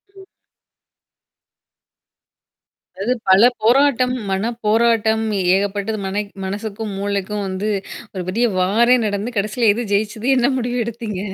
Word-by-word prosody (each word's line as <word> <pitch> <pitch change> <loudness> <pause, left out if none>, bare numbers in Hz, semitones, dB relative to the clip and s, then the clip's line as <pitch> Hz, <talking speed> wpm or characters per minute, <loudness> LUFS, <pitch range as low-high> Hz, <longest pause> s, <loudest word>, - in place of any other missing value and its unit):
ம். 385 -1 -14 2.7
அதாவது 205 +7 -1 0.2
பல 190 +2 +6 0.2
போராட்டம், 250 +1 +3 0.2
மன 195 +4 0 0.2
போராட்டம் 220 0 +2 0.3
ஏகப்பட்டது. 205 +2 -2
மனை 200 +2 -1 0.2
மனசுக்கும், 210 +2 -5
மூளைக்கும் 200 +1 -2
வந்து 190 +3 -3 0.4
ஒரு 185 -2 -4
பெரிய 230 +6 +1
வாரே 230 +7 +4
நடந்து 210 +3 -3
கடைசில 215 +3 +1
எது 240 - -3
ஜெயிச்சது 215 +4 -1
என்ன 250 +2 +3
முடிவு 245 0 -2
எடுத்தீங்க? 225 -4 -5
215 Hz, 110 wpm, -19 LUFS, 200-235 Hz, 2.7 s, பல